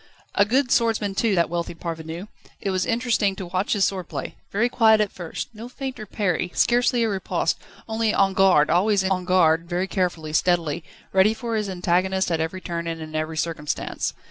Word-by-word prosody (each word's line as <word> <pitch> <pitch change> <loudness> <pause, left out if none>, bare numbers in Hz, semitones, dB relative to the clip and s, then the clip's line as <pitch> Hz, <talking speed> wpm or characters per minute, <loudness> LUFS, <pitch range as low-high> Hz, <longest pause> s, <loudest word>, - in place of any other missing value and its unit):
A 200 - +4
good 250 +4 +1
swordsman 220 -4 +2
too, 210 +1 +1
that 170 -1 +3
wealthy 170 0 -3
parvenu. 165 +2 -6 0.3
It 200 - -2
was 185 -1 0
interesting 230 -4 +1
to 190 - -6
watch 185 +3 -1
his 205 -3 +3
sword 185 -3 -3
play: 140 -4 -5 0.2
very 225 +4 +2
quiet 225 -3 +4
at 210 -2 +1
first, 175 -3 -6
no 225 +3 -9
feint 265 0 -6
or 215 - -7
parry, 180 -4 -1
scarcely 245 0 +3
a - - +2
riposte, 195 -2 -1 0.3
only 220 -1 +1
en 195 -2 +2
garde, 185 -6 +4
always 195 +3 +3
en 190 -1 0
garde 170 -2 +3
very 180 +2 0
carefully, 175 -5 -2
steadily, 170 -2 +1 0.3
ready 195 +3 +4
for 230 -1 -3
his 210 -2 -1
antagonist 185 +1 +1
at 165 -1 +1
every 165 +4 -3
turn 170 -2 -4
and 165 -1 -3
in 155 -1 -8
every 155 +1 -2
circumstance. 155 -2 -2
190 Hz, 195 wpm, -24 LUFS, 170-215 Hz, 0.3 s, A